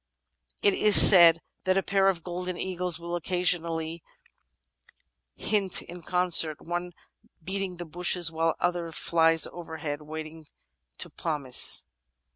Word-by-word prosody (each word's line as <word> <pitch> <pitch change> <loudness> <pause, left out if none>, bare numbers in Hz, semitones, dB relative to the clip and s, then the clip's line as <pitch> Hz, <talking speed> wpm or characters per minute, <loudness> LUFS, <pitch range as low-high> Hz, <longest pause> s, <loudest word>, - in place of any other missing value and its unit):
It 200 - +3
is 210 +1 +6
said 170 -3 +8 0.2
that 185 0 0
a 195 - -1
pair 195 -1 0
of 175 -4 -4
golden 180 0 -7
eagles 180 -2 -4
will 170 +1 -7
occasionally 170 -2 -3 1.4
himt 200 -4 0
in 175 +1 -12
concert, 170 -3 +2
one 175 +1 -6 0.5
beating 190 0 -5
the 175 - -8
bushes 175 +1 -1
while 165 0 -2
the - - -12
other 175 -2 -4
flies 165 0 +1
overhead, 160 -3 -8
waiting 155 +1 -10 0.5
to - - -6
poimce. 145 -6 -1
175 Hz, 125 wpm, -25 LUFS, 160-180 Hz, 1.4 s, said